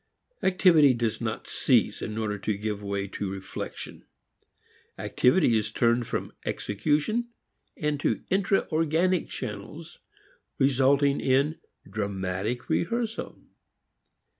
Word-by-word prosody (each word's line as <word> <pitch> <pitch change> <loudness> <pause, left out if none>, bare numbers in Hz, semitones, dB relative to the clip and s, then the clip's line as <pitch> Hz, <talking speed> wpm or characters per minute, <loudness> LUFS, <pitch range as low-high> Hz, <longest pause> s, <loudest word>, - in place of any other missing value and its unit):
Activity 170 -8 +5
does 115 -1 -1
not 110 -1 -3
cease - - +2
in 110 - -4
order 105 -2 -2
to 105 +1 -1
give 105 0 -3
way 100 -1 -2
to 100 0 -4
reflection; 95 0 -7 0.9
activity 125 -2 +3
is 110 -1 +1
turned 120 +2 +2
from - - -3
execution 150 - 0 0.5
into 150 -1 -1
intra 195 +1 +2
organic 165 +3 +1
channels, - - -7 0.6
resulting 140 +1 +3
in 140 +5 +2 0.3
dramatic 100 +2 -3
rehearsal. 230 +5 -2
130 Hz, 100 wpm, -27 LUFS, 105-160 Hz, 0.9 s, Activity